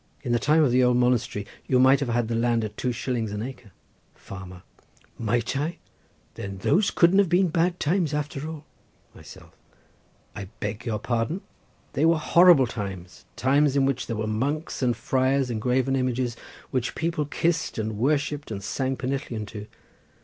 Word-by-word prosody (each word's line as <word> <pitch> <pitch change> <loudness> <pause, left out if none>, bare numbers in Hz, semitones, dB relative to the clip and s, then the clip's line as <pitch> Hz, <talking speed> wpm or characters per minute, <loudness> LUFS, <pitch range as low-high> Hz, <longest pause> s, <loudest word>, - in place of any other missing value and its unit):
In 125 - -2
the 120 - +3
time 155 +4 +4
of 135 - +3
the 125 +1 +4
old 125 0 +3
monastery 125 -4 +1 0.2
you 130 - +3
might 130 +2 +6
have 140 -4 -2
had 120 -1 0
the 115 - -2
land 115 0 +1
at 105 -1 -5
two 125 - -1
shillings 120 -2 -2
an 105 +1 -3
acre. 125 -3 -8 0.5
Farmer.—Might 100 +5 -6
I? 150 +5 -2 0.6
Then 100 -1 -6
those 185 - +2
couldn't 175 +3 +4
have 200 -4 +3
been 180 +1 +3
such - - -11
bad 175 +1 +1
times, 165 0 +1
after 150 0 -3
all. 155 -2 -8 0.5
Myself.—I 100 - -15
beg 105 +3 -4
your 110 -2 0
pardon! 120 - -2 0.5
They 150 - +2
were 165 0 +4
horrible 170 -2 +6
times—times 120 +7 -1
in 140 -1 +3
which 135 -1 -1
there 115 - -2
were 110 0 -2
monks 140 +11 -2
and 120 -3 +1
friars 130 +2 +1
and 110 -2 -3
graven 130 +2 +1
images, 125 -2 -1 0.4
which 125 -2 -1
people 160 -2 -1
kissed 165 +3 -1
and 110 -1 -3
worshipped 145 +2 0
and 100 -3 -5
sang 130 +5 -2
pennillion 130 -4 -3
to. 105 -1 -8
130 Hz, 170 wpm, -25 LUFS, 115-150 Hz, 0.6 s, might